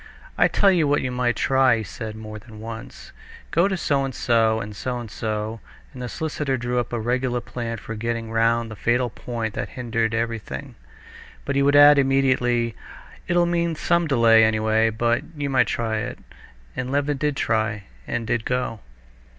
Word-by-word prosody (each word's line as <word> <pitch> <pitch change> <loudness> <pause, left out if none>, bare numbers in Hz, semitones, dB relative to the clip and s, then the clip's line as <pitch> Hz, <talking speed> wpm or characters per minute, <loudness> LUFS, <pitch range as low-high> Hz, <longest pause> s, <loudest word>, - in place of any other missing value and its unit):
"I - - +4
tell 200 -1 +3
you 170 -5 +2
what 145 +1 +2
you 130 - -2
might 125 -1 0
try," 130 -3 +3
he 110 - -3
said 110 +2 -7
more 110 -1 -8
than 110 0 -13
once; 115 +1 -9 0.4
"go 170 +4 +3
to 190 -1 -1
so 140 -5 +1
and 135 -2 -4
so 115 -3 +2
and 105 -1 -6
so 125 +4 -3
and 115 -3 -8
so," 110 0 -3 0.3
and 125 - -9
the 125 - -4
solicitor 150 -3 -2
drew 120 0 -1
up 120 - -3
a 120 - -2
regular 125 +2 0
plan 115 -1 -5
for 110 - -7
getting 115 0 -3
round 115 0 +1
the - - -6
fatal 120 +3 0
point 115 -2 -4
that - - -4
hindered 115 -2 -1
everything. 115 -12 -4 0.7
But 140 - -2
he 140 - +3
would 140 +1 +3
add 145 0 +8
immediately, 130 -4 +2 0.5
"It'll 175 0 +3
mean 170 -1 0
some 170 +1 +1
delay, 115 -5 +5
anyway, 110 0 +2
but 120 +2 +1 0.2
you 140 -1 -2
might 130 - +3
try 110 -2 -1
it." - - -5 0.6
And 125 0 -3
Levin 145 0 0
did 150 0 0
try, 110 -2 0 0.2
and 120 -1 -2
did 115 0 -1
go. 125 -3 -2
120 Hz, 185 wpm, -23 LUFS, 110-135 Hz, 0.7 s, add